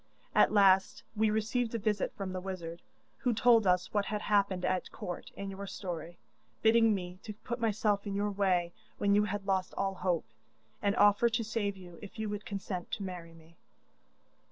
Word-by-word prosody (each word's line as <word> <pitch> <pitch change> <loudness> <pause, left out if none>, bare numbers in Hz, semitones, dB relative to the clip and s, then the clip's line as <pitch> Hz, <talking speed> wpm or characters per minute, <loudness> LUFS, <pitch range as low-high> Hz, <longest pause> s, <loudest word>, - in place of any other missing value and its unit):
At - - +5
last 195 -2 +4
we 215 0 +3
received 225 +2 0
a - - +2
visit 210 -2 0
from 190 -2 -4
the 185 - -3
wizard, 175 -3 -6 0.4
who 245 -3 +1
told 230 -2 +5
us 180 0 +2
what 205 -1 +1
had 210 -1 -3
happened 200 -3 +1
at 185 -1 -1
court, 175 - -6
and 200 0 -5
your 195 +1 -7
story, 175 -3 -6 0.5
bidding 225 -1 +5
me 180 -1 -6
to 210 -1 -8
put 240 +2 -4
myself 210 -2 +1
in 200 - -3
your 205 +1 0
way 185 -4 +1 0.2
when 200 0 +2
you 205 +1 +4
had 205 -1 -4
lost 190 -1 0
all 195 0 0
hope, 180 -6 -1 0.6
and 200 0 +1
offer 205 +2 +5
to 230 0 0
save 210 -3 -2
you 175 -2 -12
if 205 +1 -10
you 220 -1 -2
would 205 0 -5
consent 195 -3 -4
to 205 - -2
marry 175 -3 -7
me. 165 +1 -18
200 Hz, 190 wpm, -31 LUFS, 185-215 Hz, 0.6 s, At